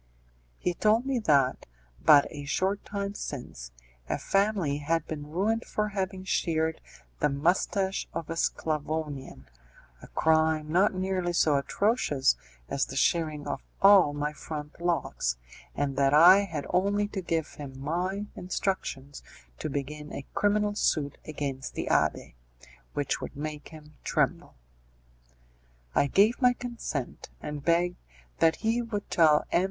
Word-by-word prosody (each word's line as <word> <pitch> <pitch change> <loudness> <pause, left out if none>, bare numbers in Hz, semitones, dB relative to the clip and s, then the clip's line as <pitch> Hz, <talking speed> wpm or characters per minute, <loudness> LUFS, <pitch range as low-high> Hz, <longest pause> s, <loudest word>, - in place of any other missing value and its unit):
He 180 - -1
told 220 +6 +2
me 270 -2 0
that, 140 - +2 0.4
but 145 -1 +7
a 145 -2 -7
short 190 +7 0
time 200 -1 -4
since, 120 - -7 0.4
a - - 0
family 195 -8 +1
had 160 +2 0
been 150 -2 -6
ruined 210 +8 0
for 210 0 -2
having 190 -1 -3
sheared 160 -3 0 0.4
the 150 - +2
moustache 185 +6 0
of 165 -1 -5
a 165 - -4
Sclavonian 150 - -2 0.6
a - - -11
crime 160 -1 +2
not 190 +3 +3
nearly 185 -1 -1
so 155 -3 +3
atrocious 145 - +1 0.3
as 135 - -1
the 135 - -8
shearing 155 0 +1
of - - -3 0.2
all 195 -6 +7
my 145 +1 -2
front 150 +1 -7
locks, 165 - -1 0.4
and 140 -1 -1
that 140 +1 +4
I 185 +6 +8
had 155 -7 -5
only 200 +3 +2
to 200 -2 -4
give 165 -3 -2
him 135 -3 -9
my 180 +8 -2
instructions 175 -7 -3 0.4
to - - -3
begin 150 +2 -5
a 140 - -6
criminal 210 0 +2
suit 145 -8 0
against 140 -3 -4
the - - -3
abbé, - - +1 0.6
which - - -1
would - - -6
make 150 0 -5
him 155 -1 -13
tremble. - - 0 1.4
I 140 - +3
gave 210 - +3
my 250 -1 +5
consent, 235 - -5
and 150 -1 -6
begged 175 +2 +2 0.4
that 165 0 +4
he 225 +2 0
would 220 -4 -4
tell 155 -3 +5
M. - - +4
160 Hz, 140 wpm, -28 LUFS, 145-195 Hz, 1.4 s, I